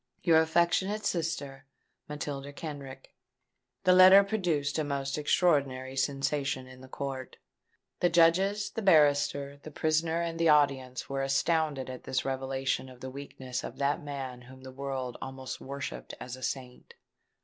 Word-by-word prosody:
"Your 160 -2 +6
affectionate 175 +6 +1
Sister, 140 -7 -3 0.4
"MATILDA 145 -1 -5
KENRICK." 140 -4 -8 0.7
This 180 - +5
letter 185 +2 +9
produced 170 -8 -1
a - - +1
most 140 -1 -2
extraordinary 140 -4 +1
sensation 135 -1 -1
in 130 0 -13
the 130 - -12
court. 130 -1 -6 0.6
The 175 - +3
Judges, 185 +5 +3
the 225 - -4
barrister, 145 -5 +3
the 155 - -9
prisoner, 160 +2 0
and 165 -1 -3
the 165 -1 +4
audience 140 -4 +2
were 135 0 -2
astounded 140 0 +1
at 130 -1 -8
this 130 - -1
revelation 135 0 -2
of 125 -1 -14
the 130 - -6
weakness 130 -2 -6
of - - -7
that 145 +4 0
man 135 -4 -6
whom 130 +1 -14
the 130 - -9
world 130 -2 -4
almost 130 -1 -6
worshipped 135 - -6
as 125 0 -6
a 130 - -13
saint. 125 -1 -6
140 Hz, 150 wpm, -29 LUFS, 130-160 Hz, 0.7 s, letter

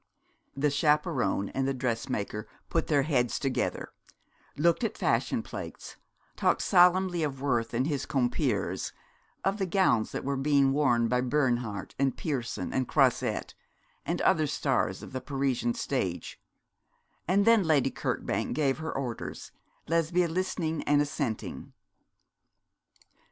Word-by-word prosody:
The 145 +1 +2
chaperon 145 -8 +1
and 135 0 -1
the 135 - 0
dressmaker 115 -4 -2 0.2
put 165 - +1
their 145 -3 +3
heads 125 -5 +1
together, 135 -2 -2 0.6
looked 170 +8 +2
at 225 - -1
fashion - - +1
plates, - - -8 0.4
talked - - +1
solemnly 180 -1 +4
of 140 -4 -2
Worth 120 -5 0
and 125 +3 +1
his 145 -3 -2
compeers, 125 -3 0 0.5
of 195 +2 +1
the 190 - 0
gowns 175 - +2
that - - -4
were 140 0 -1
being 140 0 +3
worn 120 -5 +3
by 125 +2 +1
Bernhardt, 125 -5 -1
and 135 -1 +1
Pierson, 125 - -3
and 130 -2 0
Croisette, - - +1 0.5
and - - -2
other 155 -2 +3
stars 140 -2 0
of - - -9
the 130 - -3
Parisian 130 -3 -1
stage; 95 -10 -3 0.9
and 195 +3 +3
then 230 -1 +6
Lady 155 -5 +2
Kirkbank - - -2
gave 140 -2 +1
her 160 0 -3
orders, 125 -4 -5 0.4
Lesbia 170 +2 +2
listening 165 -2 -2
and 145 0 +4
assenting. 140 -5 -3
140 Hz, 130 wpm, -29 LUFS, 125-160 Hz, 0.9 s, then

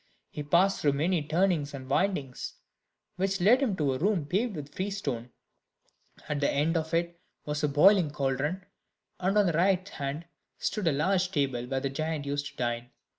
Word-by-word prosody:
He 150 - -5
passed 175 +7 +3
through 145 -2 +3
many 165 +4 +1
turnings 155 -2 +1
and 130 -1 -8
windings, 140 -3 -1 0.6
which 195 +1 0
led 225 +9 +5
him 235 -8 +1
to 145 -6 +1
a 130 - -3
room 185 -4 +1
paved 200 +7 0
with 145 -1 -7
freestone; 150 - -3 1.0
at 150 -1 -1
the 140 - +2
end 155 +4 +1
of 160 -1 -1
it 170 0 -1 0.2
was 150 0 -3
a - - +4
boiling 175 +3 +5
cauldron, 145 +6 -2 0.5
and 190 +3 +1
on 205 - +5
the 175 - +1
right 185 +3 +2
hand 145 0 -5 0.3
stood 210 -5 -2
a - - +5
large 180 +6 +1
table, 135 -6 -1
where 135 0 -1
the 135 -1 -2
giants 155 0 -2
used 145 +1 -2
to - - -12
dine. 120 -1 -2
155 Hz, 180 wpm, -29 LUFS, 140-185 Hz, 1.0 s, led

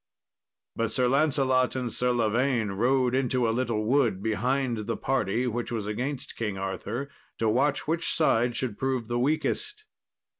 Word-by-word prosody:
But 115 -1 -1
Sir 125 +1 +1
Lancelot 135 -2 +2
and 125 -3 -3
Sir 125 - +1
Lavaine 120 0 +1
rode 125 +5 +2
into 130 -2 +1
a - - +2
little 115 -3 -1
wood 115 -6 +2
behind 120 0 0
the 115 - -1
party 125 -2 0
which 120 0 -2
was 110 -3 -2
against 125 +7 -4
King 105 -4 -3
Arthur, 105 +7 -4 0.3
to 115 - 0
watch 135 +8 +1
which 165 +2 0
side 120 -6 +2
should 120 -5 -3
prove 130 -4 -1
the 120 +1 -1
weakest. 415 - -1
125 Hz, 155 wpm, -27 LUFS, 115-135 Hz, 0.3 s, Lancelot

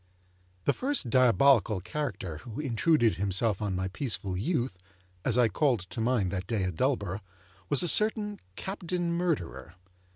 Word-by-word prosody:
The - - +3
first 260 - -1
diabolical 130 -4 +4
character 95 - -4
who 110 - -8
intruded 130 - +2
himself 100 +2 +1
on 100 -3 -1
my 95 +1 -1
peaceful 100 -4 -3
youth 125 - -1 0.5
(as 120 +2 +1
I 120 -2 +5
called 120 - +1
to 90 +5 -6
mind 115 -6 +1
that 95 -1 -4
day 110 -5 0
at 90 -2 -2
Dullborough), 105 - -1 0.5
was 145 - +3
a - - +2
certain 210 +2 +2 0.2
Captain 180 - -3
Murderer. 85 - -2
115 Hz, 150 wpm, -29 LUFS, 95-150 Hz, 0.5 s, I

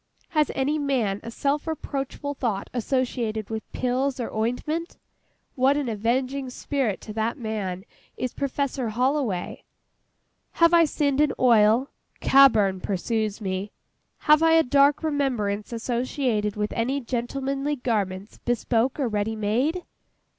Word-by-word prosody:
Has 305 -5 +2
any 290 +3 0
man 245 -9 0
a - - -7
self 285 +6 -1
reproachful 285 -2 -4
thought 225 -8 -3
associated 240 -3 -1
with 220 0 -5
pills, 255 +2 -1
or 240 - -4
ointment? 300 - -2 0.6
What 270 +1 +3
an 290 -3 -1
avenging 255 +5 -1
spirit 255 -5 -2
to 215 - -8
that 220 +4 -1
man 205 -6 -4 0.3
is 255 - -3
PROFESSOR 275 -3 -2
HOLLOWAY! 250 -4 -1 0.9
Have 335 0 +4
I 335 -1 +7
sinned 290 -2 +1
in 300 -2 +3
oil? 235 +1 +4 0.3
CABBURN 220 -9 +5
pursues 215 +3 -2
me. 190 +1 -3 0.5
Have 305 0 +5
I 325 0 +5
a 325 0 +6
dark 280 +3 +3
remembrance 245 -10 -1
associated 235 -2 -1
with 210 0 -2
any 255 +5 0
gentlemanly 270 +3 -2
garments, 205 -6 -2
bespoke 240 +2 0
or 270 - +1
ready 210 0 -1
made? 250 - 0
250 Hz, 130 wpm, -25 LUFS, 220-280 Hz, 0.9 s, I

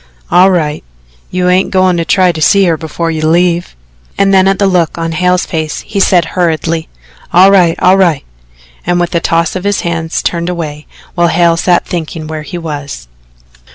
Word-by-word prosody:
"All 185 +2 +5
right. 155 -5 -1 0.5
You 180 0 -1
ain't 180 +1 +2
goin' 185 -1 +2
to 165 - -1
try 185 0 +3
to 160 -2 -7
see 200 +5 +4
her 170 -2 +2
before 165 +1 -4
you 155 -1 -2
leave?" 175 - +1 0.4
And 195 0 +2
then 190 0 +4
at 195 0 +1
the 200 - +1
look 180 -5 0
on 165 0 -3
Hale's 180 +2 0
face 155 -2 -4
he 205 -2 -4
said 180 -3 +3
hurriedly: 165 -2 -1 0.4
"All 185 +3 +6
right 180 -4 +3
all 185 +1 +4
right," 170 -7 +1 0.6
and 175 +1 0
with 175 +1 -2
a 170 - +2
toss 165 0 0
of 185 - -4
his 205 0 0
hands 165 -1 -3
turned 170 0 -2
away, 155 -4 -6 0.3
while 175 -1 +1
Hale 170 0 +2
sat 175 +1 +1
thinking 160 -2 -5
where 155 0 -6
he 175 +4 -7
was. 145 - -7
170 Hz, 190 wpm, -11 LUFS, 160-180 Hz, 0.6 s, All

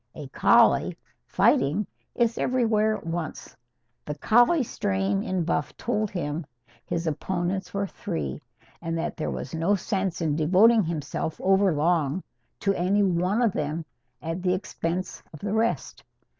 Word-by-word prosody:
A 150 -3 -7
collie, - - +4 0.3
fighting, 150 +10 +2 0.3
is 235 -1 +1
everywhere 220 -4 +2
at - - -14
once. 165 -1 -5 0.5
The 150 - -5
collie 240 - +4
strain 195 -3 -1
in 185 -5 -1
Buff 155 -3 -2
told 215 -2 -1
him 165 -3 -3 0.4
his 170 0 -3
opponents 175 +4 -2
were 200 0 -1
three, 75 - -4 0.4
and 165 -1 -2
that 165 - -3
there 75 - -3
was 65 -2 -5
no 165 +5 +2
sense 190 -1 -2
in 155 -4 0
devoting 195 +8 +5
himself 160 -1 -3
over 195 0 +3
long 160 +1 +1 0.4
to 195 - +2
any 195 +3 +2
one 185 +5 +1
of 220 -5 +2
them 155 +2 -3 0.4
at 165 +3 -3
the 180 0 +2
expense 185 -1 -4
of 155 - -9
the 205 0 -2
rest. 225 +1 -1
180 Hz, 145 wpm, -26 LUFS, 160-205 Hz, 0.5 s, devoting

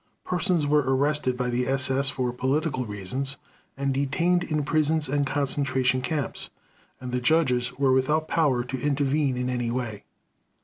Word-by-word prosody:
Persons 180 -3 +1
were 150 +1 +4
arrested 135 -1 +1
by 125 -1 -1
the 125 +1 0
SS 135 +1 +2
for 125 -3 -2
political 130 0 -1
reasons, 125 +7 -4 0.4
and 140 0 0
detained 170 +6 +1
in 155 -3 -1
prisons 155 0 +1
and 140 +1 0
concentration 135 -2 0
camps; 145 -1 -3 0.5
and 125 -1 -6
the 125 0 -1
judges 125 -3 +1
were 135 -1 +3
without 150 +5 +1
power 140 -7 +2
to 130 +1 -5
intervene 140 -1 +1
in 125 0 -1
any 125 -2 -1
way. 115 -4 -4
135 Hz, 150 wpm, -26 LUFS, 125-150 Hz, 0.5 s, were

